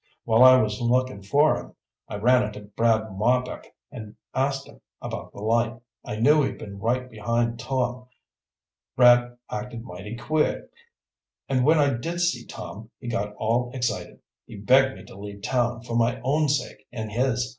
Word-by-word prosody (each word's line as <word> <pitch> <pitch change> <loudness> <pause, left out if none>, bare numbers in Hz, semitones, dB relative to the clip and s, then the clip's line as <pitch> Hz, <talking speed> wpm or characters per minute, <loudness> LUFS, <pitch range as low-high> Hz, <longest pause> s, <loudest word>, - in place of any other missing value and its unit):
While 115 +1 +5
I 130 0 +9
was 105 -2 -1
looking 125 -3 +1
for 145 +10 +3
him, - - -9 0.3
I - - -6
ran 125 +5 +4
into 105 -2 -4
Brad 110 +1 0
Marbek 125 +5 -1 0.2
and 110 -3 -9 0.2
I 130 +1 +2
asked 135 -1 -5
him - - -17 0.2
about - - -6
the 100 - -10
light. 115 +1 +1 0.2
I 105 - -5
knew 145 +8 +4
he'd 135 - -2
been 100 -1 -9
right 125 +4 0
behind 115 +1 -1
Tom. 125 0 -2 0.9
Brad 120 -1 +5
acted 125 -2 -5
mighty 100 +2 -8
queer, 150 +6 -1 0.8
and 130 -2 +1
when 155 +4 +5
I 145 -2 +3
did 165 +9 -4
see 170 -9 0
Tom, 110 +2 -9
he 120 - -6
got 105 -2 -2
all 120 +3 0
excited. 120 -3 -3 0.3
He - - -10
begged 130 +6 +4
me - - -12
to - - -13
leave 100 0 -9
town, 120 -2 0
for 115 -1 -5
my 120 +2 +2
own 145 +4 +1
sake 145 +1 -2
and 110 -3 -5
his. 125 +1 0
120 Hz, 175 wpm, -25 LUFS, 110-130 Hz, 0.9 s, I